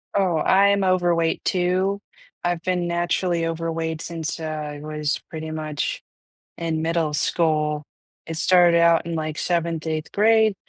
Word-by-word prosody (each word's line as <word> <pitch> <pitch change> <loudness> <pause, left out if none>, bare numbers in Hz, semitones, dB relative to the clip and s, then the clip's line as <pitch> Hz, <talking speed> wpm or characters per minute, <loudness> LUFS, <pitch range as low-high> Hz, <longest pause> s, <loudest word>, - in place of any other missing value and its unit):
Oh, 180 -5 +2
I'm 200 +3 +4
overweight 175 -3 +1
too. 185 +2 +1 0.4
I've 175 -1 -1
been 180 -1 0
naturally 175 0 0
overweight 165 -1 -3
since 165 -1 -3
I 150 -2 -5
was 150 -1 -2
pretty 160 -1 -6
much 155 -2 -3 0.6
in 160 -2 -2
middle 165 -2 0
school. 150 -1 +1 0.4
It 165 -1 -5
started 175 -1 +5
out 170 -1 +4
in, 170 -1 -3
like, 155 -1 -3
7th, 170 -2 -1
8th 155 -1 -3
grade, 220 0 +4
165 Hz, 135 wpm, -23 LUFS, 155-180 Hz, 0.6 s, started